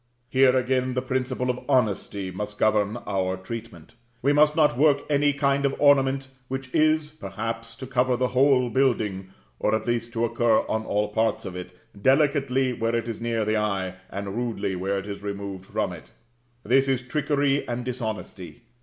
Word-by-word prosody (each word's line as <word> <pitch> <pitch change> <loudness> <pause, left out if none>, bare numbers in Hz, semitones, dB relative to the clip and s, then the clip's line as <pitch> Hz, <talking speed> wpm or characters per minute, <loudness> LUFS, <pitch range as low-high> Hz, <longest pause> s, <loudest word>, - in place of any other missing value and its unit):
Here, 130 0 +4
again, 130 0 0
the 125 - +1
principle 130 -1 -1
of 125 - -6
honesty 100 -6 0
must 105 +3 -5
govern 105 0 +2
our 95 -1 -1
treatment: 115 +6 -8 0.3
we 140 +2 +4
must 150 +1 +4
not 150 -6 +4
work 145 +1 +3
any 145 0 +3
kind 140 -1 +1
of 140 - +1
ornament 135 -2 +3 0.2
which 130 0 -5
is, 155 0 +2
perhaps, 115 -2 -5
to 130 - -8
cover 125 -1 +1
the 125 0 +1
whole 130 -2 +3
building 110 -7 0 0.3
(or 110 - +2
at 110 0 -3
least 120 -1 -1
to 115 0 +1
occur 115 -1 +2
on 110 0 -1
all 105 0 0
parts 110 +1 0
of 90 - -6
it) 90 0 -8 0.3
delicately 135 -1 +2
where 115 0 -1
it 115 0 -1
is 115 -1 -5
near 115 -2 0
the 110 +1 +1
eye, 100 -3 -1 0.2
and 100 0 -5
rudely 115 -5 -2
where 95 +2 -1
it 95 - -4
is 100 -1 -6
removed 100 -2 -6
from - - -2
it. - - -12 0.5
That 135 +5 +3
is 130 -2 0
trickery 140 +1 0
and 120 0 -3
dishonesty. 110 -6 -5
120 Hz, 180 wpm, -25 LUFS, 105-135 Hz, 0.5 s, Here